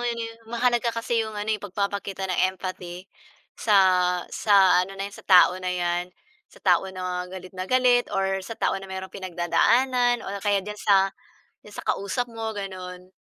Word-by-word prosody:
'yon. 240 Hz, -1 st, -1 dB, 0.3 s
Mahalaga 240 Hz, 0 st, +1 dB
ka 230 Hz, 0 st, -3 dB
kasi 230 Hz, -1 st, +1 dB
'yong 220 Hz, -1 st, -4 dB
ano 210 Hz, +1 st, -1 dB
eh, 210 Hz, -, -2 dB
pagpapakita 200 Hz, -1 st, -3 dB
ng 185 Hz, -2 st, -1 dB, 0.2 s
empathy 180 Hz, -1 st, -7 dB, 0.5 s
sa 210 Hz, -3 st, +2 dB, 0.6 s
sa 195 Hz, -4 st, +5 dB
ano 195 Hz, +1 st, -5 dB
na 195 Hz, -, -3 dB
'yan, 200 Hz, -, -7 dB
sa -, -, -13 dB
tao 180 Hz, -1 st, +7 dB
na 185 Hz, -, -3 dB
'yan, 175 Hz, 0 st, -1 dB, 0.4 s
sa -, -, -22 dB
tao 185 Hz, +1 st, +3 dB
na 180 Hz, -1 st, -4 dB
galit 185 Hz, 0 st, -9 dB
na 185 Hz, 0 st, -6 dB
galit 250 Hz, -1 st, +3 dB
or 195 Hz, 0 st, -1 dB
sa 225 Hz, +4 st, -8 dB
tao -, -, 0 dB
na 195 Hz, -, -10 dB
mayrong 190 Hz, 0 st, -7 dB
pinagdadaanan 240 Hz, +7 st, +1 dB
o 200 Hz, 0 st, -5 dB
kaya 200 Hz, -2 st, +1 dB
diyan 210 Hz, 0 st, -7 dB
sa 195 Hz, -1 st, +3 dB, 0.5 s
diyan 210 Hz, -, -14 dB
sa -, -, -19 dB
kausap 245 Hz, +5 st, -1 dB
mo 225 Hz, -1 st, -5 dB
gano'n. 185 Hz, -2 st, -7 dB
195 Hz, 180 wpm, -25 LUFS, 185-220 Hz, 0.6 s, tao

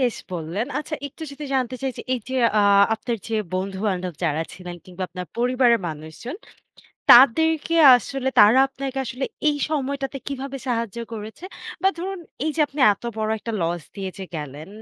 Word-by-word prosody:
বেশ 245 Hz, -3 st, +1 dB, 0.2 s
বললেন। 175 Hz, +7 st, -3 dB
আচ্ছা, 305 Hz, +1 st, -4 dB
একটু 295 Hz, +4 st, -11 dB
যদি 280 Hz, +2 st, -8 dB
জানতে 255 Hz, -1 st, 0 dB
চাই 265 Hz, -, 0 dB
যে, -, -, -5 dB
এই 250 Hz, -, 0 dB
যে 260 Hz, -, -2 dB, 0.2 s
আ -, -, +4 dB, 0.3 s
আপনার 235 Hz, +1 st, -3 dB
যে 225 Hz, -, -2 dB, 0.2 s
বন্ধু-বান্ধব 190 Hz, -2 st, -2 dB
যারা 160 Hz, 0 st, +1 dB
ছিলেন, 180 Hz, -1 st, -8 dB
কিংবা 185 Hz, 0 st, -8 dB
আপনার 180 Hz, -1 st, -7 dB
পরিবারের 245 Hz, -2 st, +3 dB
মানুষজন 160 Hz, -, -7 dB, 0.7 s
তাদেরকে 320 Hz, +6 st, +6 dB, 0.2 s
আসলে 265 Hz, +3 st, -3 dB
তারা 220 Hz, +5 st, +7 dB
আপনাকে 270 Hz, 0 st, -5 dB
আসলে 255 Hz, +3 st, -4 dB, 0.2 s
এই 295 Hz, -, +1 dB
সময়টাতে 275 Hz, -2 st, -2 dB
কিভাবে 275 Hz, 0 st, -5 dB
সাহায্য 230 Hz, -2 st, -2 dB
করেছে? 220 Hz, +9 st, -8 dB, 0.4 s
বা 385 Hz, -, +5 dB
ধরুন 380 Hz, +2 st, -4 dB, 0.3 s
এই 315 Hz, -, +1 dB
যে -, -, 0 dB
আপনি 285 Hz, 0 st, -7 dB
এত 200 Hz, -, -11 dB
বড় 215 Hz, 0 st, -1 dB
একটা 230 Hz, +2 st, -5 dB
loss 170 Hz, 0 st, -1 dB
দিয়ে 190 Hz, -1 st, -4 dB
যে 190 Hz, -, -5 dB
গেলেন 150 Hz, +2 st, -7 dB
235 Hz, 170 wpm, -23 LUFS, 190-275 Hz, 0.7 s, তারা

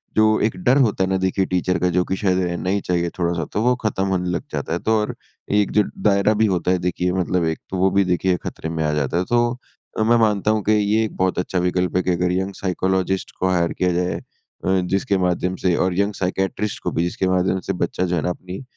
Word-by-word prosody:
जो 110 Hz, -, +5 dB, 0.2 s
एक 110 Hz, -, -1 dB
डर 130 Hz, -4 st, +4 dB
होता 105 Hz, -3 st, 0 dB
है 95 Hz, -, 0 dB
ना 95 Hz, -, +1 dB
देखिए 95 Hz, +1 st, 0 dB
टीचर 90 Hz, 0 st, 0 dB
का, 90 Hz, -, +2 dB
जो 90 Hz, +1 st, +2 dB
कि 95 Hz, -, -1 dB
शायद 95 Hz, -2 st, +1 dB
रहना 90 Hz, +1 st, -2 dB
ही 100 Hz, +1 st, +1 dB
चाहिए 85 Hz, -1 st, 0 dB
थोड़ा-सा, 85 Hz, -2 st, -1 dB
तो 105 Hz, -, -3 dB
वो 125 Hz, +1 st, +3 dB
ख़त्म 95 Hz, -3 st, 0 dB
होने 90 Hz, -2 st, -1 dB
लग 90 Hz, 0 st, -2 dB
जाता 75 Hz, +2 st, -3 dB
है। 85 Hz, -, -1 dB
तो 110 Hz, +3 st, +1 dB
और 105 Hz, -, -3 dB, 0.4 s
एक 100 Hz, -, +1 dB
जो 105 Hz, -, +4 dB, 0.2 s
दायरा 100 Hz, 0 st, +3 dB
भी 110 Hz, +1 st, +2 dB
होता 90 Hz, -3 st, +1 dB
है 95 Hz, -, +3 dB
देखिए 90 Hz, 0 st, 0 dB
मतलब 90 Hz, -1 st, 0 dB
एक 80 Hz, 0 st, -1 dB
तो 95 Hz, -, -3 dB
वो 95 Hz, +1 st, +3 dB
भी 100 Hz, +1 st, +3 dB
देखिए 90 Hz, 0 st, +1 dB
ख़तरे 80 Hz, -, -5 dB
में 80 Hz, -1 st, -2 dB
आ 75 Hz, -, +1 dB
जाता 75 Hz, +1 st, 0 dB
है। 90 Hz, -, +1 dB
तो 120 Hz, 0 st, +3 dB, 0.5 s
अ, 110 Hz, -, +2 dB
मैं 120 Hz, +2 st, +4 dB
मानता 105 Hz, -2 st, +2 dB
हूँ 110 Hz, -1 st, 0 dB
कि 105 Hz, -, +1 dB
ये 105 Hz, +1 st, +2 dB
एक 110 Hz, -, -7 dB
बहुत 95 Hz, 0 st, +1 dB
अच्छा 90 Hz, 0 st, -1 dB
विकल्प 90 Hz, 0 st, 0 dB
है 90 Hz, -, +1 dB
कि 90 Hz, -, +1 dB
अगर 90 Hz, 0 st, +1 dB
यंग 95 Hz, +2 st, -1 dB
साइकोलॉजिस्ट 95 Hz, 0 st, -1 dB
को 95 Hz, -, +1 dB
हायर 85 Hz, -2 st, +1 dB
किया 90 Hz, -1 st, 0 dB
जाए 90 Hz, +1 st, 0 dB, 0.5 s
अ, 95 Hz, 0 st, +3 dB
जिसके 95 Hz, +2 st, 0 dB
माध्यम 90 Hz, +1 st, -1 dB
से 90 Hz, -2 st, +4 dB
और 90 Hz, +1 st, 0 dB
यंग 100 Hz, +1 st, +1 dB
साइकेट्रिस्ट 95 Hz, +3 st, -2 dB
को -, -, -1 dB
भी, 85 Hz, -, 0 dB
जिसके 90 Hz, +2 st, -1 dB
माध्यम 95 Hz, 0 st, +1 dB
से -, -, +2 dB
बच्चा 90 Hz, -, -3 dB
जो 90 Hz, 0 st, -1 dB
है 80 Hz, -, 0 dB
ना 90 Hz, -, -1 dB
अपनी 90 Hz, +4 st, -6 dB
95 Hz, 255 wpm, -21 LUFS, 90-100 Hz, 0.5 s, जो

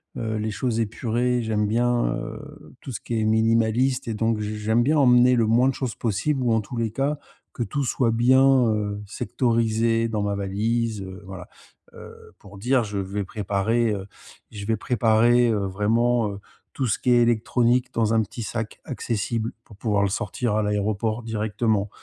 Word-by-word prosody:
heu, 110 Hz, -1 st, -3 dB
les 110 Hz, 0 st, -2 dB
choses 115 Hz, +2 st, -2 dB
épurées, 120 Hz, +2 st, 0 dB
j'aime 110 Hz, -2 st, 0 dB
bien, 120 Hz, +3 st, +1 dB
heu, -, -, -9 dB
tout 135 Hz, -, -7 dB
ce 115 Hz, -, -6 dB
qui 115 Hz, -2 st, -2 dB
est 110 Hz, -, 0 dB
minimaliste 115 Hz, +4 st, +2 dB
et 115 Hz, -, -2 dB
donc 110 Hz, 0 st, 0 dB
j 105 Hz, 0 st, -4 dB
j'aime 110 Hz, +3 st, +2 dB
bien 155 Hz, +4 st, +2 dB
emmener 125 Hz, -1 st, +5 dB
le 115 Hz, -2 st, +2 dB
moins 120 Hz, +4 st, +4 dB
de 135 Hz, -, +1 dB
choses 125 Hz, -3 st, -4 dB
possibles 125 Hz, +5 st, -1 dB
ou 120 Hz, -, +1 dB
en 110 Hz, -, +2 dB
tous 120 Hz, +4 st, -8 dB
les 115 Hz, -2 st, -1 dB
cas, 140 Hz, +5 st, -1 dB, 0.3 s
que 120 Hz, -, -3 dB
tout 145 Hz, +3 st, -2 dB
soit 120 Hz, -2 st, +1 dB
bien, 130 Hz, +4 st, +4 dB, 0.2 s
heu, 105 Hz, -1 st, -2 dB
sectorisé 115 Hz, 0 st, 0 dB
dans 110 Hz, -2 st, -2 dB
ma 100 Hz, 0 st, -1 dB
valise, 110 Hz, +2 st, -1 dB
heu, 95 Hz, +2 st, -9 dB
voilà. 95 Hz, -1 st, -9 dB, 0.5 s
Heu, -, -, -13 dB
pour 100 Hz, 0 st, -14 dB
dire 125 Hz, +2 st, +2 dB
je 105 Hz, -2 st, -4 dB
vais 100 Hz, +1 st, -3 dB
préparer, 105 Hz, +4 st, 0 dB
heu, 95 Hz, -1 st, -5 dB, 0.5 s
je 105 Hz, -2 st, -7 dB
vais 110 Hz, -2 st, +1 dB
préparer, 120 Hz, +1 st, +3 dB
heu, 105 Hz, -3 st, 0 dB
vraiment, 110 Hz, +3 st, +1 dB
heu, 100 Hz, -, -8 dB, 0.3 s
tout 130 Hz, -3 st, -1 dB
ce 105 Hz, -, +1 dB
qui 125 Hz, -, 0 dB
est 120 Hz, 0 st, +5 dB
électronique 120 Hz, +2 st, +1 dB
dans 115 Hz, -1 st, +1 dB
un 110 Hz, -, +4 dB
petit 115 Hz, -, -8 dB
sac 115 Hz, 0 st, -5 dB
accessible 115 Hz, -2 st, -3 dB
pour 105 Hz, -, -16 dB
pouvoir 105 Hz, -2 st, 0 dB
le 100 Hz, -, +1 dB
sortir 105 Hz, +3 st, -2 dB
à 110 Hz, -, +1 dB
l'aéroport 105 Hz, +2 st, -1 dB
directement. 110 Hz, -1 st, -1 dB
115 Hz, 190 wpm, -24 LUFS, 105-120 Hz, 0.5 s, emmener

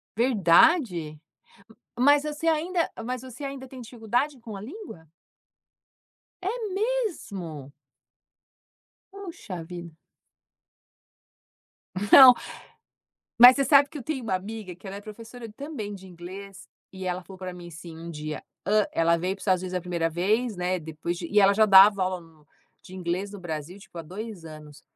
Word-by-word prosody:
Verdade? 200 Hz, -, +3 dB, 0.8 s
Mas 285 Hz, +3 st, +5 dB
você 300 Hz, +2 st, -2 dB
ainda 330 Hz, +2 st, 0 dB
mas 250 Hz, 0 st, -4 dB
você 260 Hz, +2 st, -9 dB
ainda 275 Hz, -1 st, -7 dB
tem 260 Hz, -1 st, -11 dB
dificuldade 245 Hz, +4 st, -2 dB
com 220 Hz, -3 st, -8 dB
a -, -, -8 dB
língua? 235 Hz, -, -10 dB, 1.4 s
É 370 Hz, -, -2 dB, 0.2 s
mesmo? 220 Hz, -, -3 dB, 1.4 s
Puxa 335 Hz, -, -8 dB
vida. 170 Hz, 0 st, -9 dB, 2.2 s
Não, 260 Hz, -2 st, +11 dB, 1.1 s
mas 250 Hz, +3 st, +10 dB
você 275 Hz, -, +1 dB
sabe 280 Hz, +1 st, +5 dB
que 300 Hz, -, -9 dB
eu -, -, -7 dB
tenho 280 Hz, -1 st, -4 dB
uma 205 Hz, -4 st, -1 dB
amiga 200 Hz, 0 st, -6 dB
que 185 Hz, -, -15 dB
ela 195 Hz, +1 st, -6 dB
é -, -, -7 dB
professora 225 Hz, +2 st, -10 dB
também 275 Hz, -9 st, -6 dB
de 190 Hz, -1 st, -12 dB
inglês 190 Hz, +3 st, -11 dB, 0.2 s
e 190 Hz, -1 st, -8 dB
ela 180 Hz, 0 st, -2 dB
falou 190 Hz, +1 st, -13 dB
pra 185 Hz, -1 st, -6 dB
mim 175 Hz, -1 st, -10 dB
assim 165 Hz, 0 st, -11 dB
um 170 Hz, +1 st, -8 dB
dia, 155 Hz, -1 st, -6 dB, 0.2 s
hã, 210 Hz, +1 st, +3 dB
ela 165 Hz, 0 st, +3 dB
veio 185 Hz, +3 st, -2 dB
para 195 Hz, -, -16 dB
o -, -, -11 dB
Estados 185 Hz, -2 st, +1 dB
Unidos 185 Hz, 0 st, -5 dB
a -, -, -1 dB
1º 170 Hz, -2 st, -1 dB
vez, 205 Hz, +7 st, 0 dB
né, 180 Hz, +1 st, -1 dB
depois 160 Hz, +2 st, -5 dB
de -, -, -5 dB
e 210 Hz, 0 st, +3 dB
ela 195 Hz, 0 st, +6 dB
já 215 Hz, +2 st, +4 dB
dava 195 Hz, 0 st, +7 dB
aula 185 Hz, -1 st, -2 dB
no 160 Hz, -2 st, -21 dB, 0.4 s
de 185 Hz, -, -13 dB
inglês 185 Hz, +2 st, -3 dB
no 200 Hz, -, -9 dB
Brasil, 160 Hz, +2 st, -6 dB
tipo, 190 Hz, -, -17 dB
há 165 Hz, -, -5 dB
2 190 Hz, +2 st, -8 dB
anos. 155 Hz, -2 st, -12 dB
195 Hz, 160 wpm, -26 LUFS, 175-250 Hz, 2.2 s, Não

